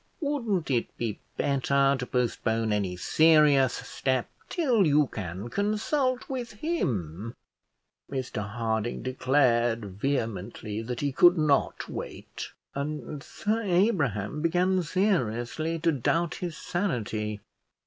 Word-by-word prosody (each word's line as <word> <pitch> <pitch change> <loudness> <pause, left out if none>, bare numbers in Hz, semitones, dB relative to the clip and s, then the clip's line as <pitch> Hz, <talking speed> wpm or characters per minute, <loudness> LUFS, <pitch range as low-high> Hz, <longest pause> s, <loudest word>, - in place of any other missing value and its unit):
Wouldn't 230 - -1
it 120 -3 +1
be 110 -3 -3 0.2
better 140 0 +2
to 125 -2 -4
postpone 115 -3 0
any 95 -3 -1
serious 150 - +5
step 130 -2 -1 0.2
till 245 - +3
you 150 0 +4
can 95 -3 -6
consult 245 - 0
with 250 -4 -4
him?" 115 - -2 0.8
Mr 130 -5 -3
Harding 110 0 -2
declared 125 -3 +2 0.2
vehemently 110 -5 -2
that 120 +1 -4
he 145 -1 0
could 175 +6 +6
not 150 -3 +1
wait, - - -7 0.2
and 150 +1 -4
Sir 220 +8 -2
Abraham 165 - +1
began 180 +3 +2
seriously 160 - 0
to 165 +1 +2
doubt 160 +5 0
his 175 -3 -5
sanity. 110 - -2
140 Hz, 110 wpm, -28 LUFS, 115-175 Hz, 0.8 s, could